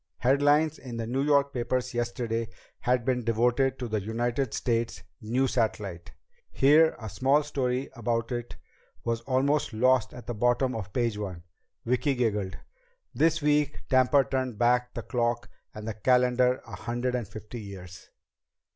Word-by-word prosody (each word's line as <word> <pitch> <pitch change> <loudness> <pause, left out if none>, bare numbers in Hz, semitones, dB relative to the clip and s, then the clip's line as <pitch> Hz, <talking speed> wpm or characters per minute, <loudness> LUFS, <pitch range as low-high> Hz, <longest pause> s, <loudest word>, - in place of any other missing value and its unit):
Headlines 145 +4 +3
in 120 -3 -7
the 115 - -3
New 130 +4 -1
York 140 -1 +3
papers 125 +1 -1
yesterday 120 -1 -2 0.3
had 125 -1 +1
been 125 -2 0
devoted 120 +4 +2
to 125 - -4
the 110 -2 -1
United 120 +5 -1
States 115 -6 -1 0.2
new 120 +5 +1
satellite. 105 -8 -2 0.4
Here 155 +4 +5
a 110 - -6
small 135 +10 +2
story 130 -3 -1
about 115 0 -2
it 120 -1 -4 0.5
was 115 0 -1
almost 135 +2 +1
lost 130 +2 +3
at 125 - -10
the 120 - -3
bottom 120 +3 +1
of 105 -3 -5
page 115 -2 -1
one. 90 -5 -5 0.4
Vicki 125 +3 +1
giggled. 105 -6 -1 0.6
This 160 -1 +2
week 150 -1 +1
Tampa 130 +1 +5
turned 130 -3 -2
back 125 +1 +2
the - - -4
clock 120 -1 -1 0.2
and 105 +1 -8
the 110 - -2
calendar 125 +3 +2
a - - -8
hundred 120 +1 -2
and 120 -4 -2
fifty 110 +3 -8
years! 95 -3 -10
120 Hz, 155 wpm, -28 LUFS, 115-130 Hz, 0.6 s, Here